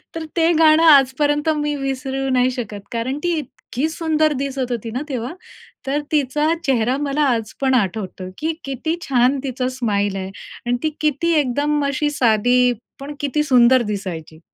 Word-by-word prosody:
तर 325 -1 -4
ते 330 +1 +4
गाणं 315 0 +6
आजपर्यंत 290 0 +4
मी 295 0 -1
विसरू 270 -1 -3
नाही 255 0 +2
शकत, 220 -5 -5
कारण 240 +4 -2
ती 345 -2 +1
उत्सुक 290 - -7 0.2
इतकी 275 +6 -1
सुंदर 315 -1 +1
दिसत 270 -2 -3
होती 230 -1 -3
ना 250 +4 -3
तेव्हा. 250 +1 -3 0.5
तर 290 +2 0
तिचा 300 +2 +1
चेहरा 250 -2 +2
मला 290 +1 -1
आज 220 -1 -5
पण 265 -1 +2
आठवतो, 190 -4 -2
की 320 +1 -1
किती 275 +4 -2
छान 265 -2 +2
तिचा 255 -2 -2
स्माईल 205 -6 -1
आहे. 190 0 -4 0.4
आणि 245 0 +1
ती 315 - +2
किती 305 +3 +1
एकदम 290 +2 0
अशी 280 +2 0
साधी, 245 0 +3 0.3
पण 280 +2 -7
किती 290 +1 0
सुंदर 255 -2 +5
दिसायची. 165 -6 -6
265 Hz, 165 wpm, -20 LUFS, 240-295 Hz, 0.5 s, गाणं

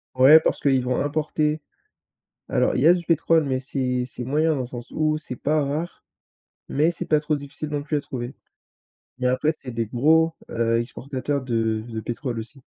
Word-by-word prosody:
Ouais, 140 +5 +8
parce - - -1
qu'ils 135 -2 +3
vont 125 0 -1
importer. 150 +1 0 0.9
Alors, - - +2
il - - +1
y 155 - +5
a 175 - +8
du 175 -1 -2
pétrole, 165 -1 +3
mais 130 -2 -1
c'est 125 -2 -1
c'est 125 - -7
moyen 155 +5 +2
dans 130 - -1
le - - -3
sens 120 -1 -9
où 155 0 +1
c'est 135 -4 -7
pas 150 +4 +1
rare, 150 +5 -4 0.6
mais 155 +4 +2
c'est 170 - -4
pas 155 - +3
trop 150 0 0
difficile 145 +1 -6
non 145 -1 -2
plus 150 0 -1
à - - -2
trouver. 130 -2 -6 0.8
Mais 125 - -3
après, 130 +4 +2
c'est 125 - -7
des 115 -1 -2
gros, 160 +7 +3 0.2
heu, 115 0 +1
exportateurs 135 +3 -3
de 115 -3 0
de 110 -1 -5
pétrole 120 +1 -4
aussi. 125 +4 -8
140 Hz, 200 wpm, -24 LUFS, 125-155 Hz, 0.9 s, Ouais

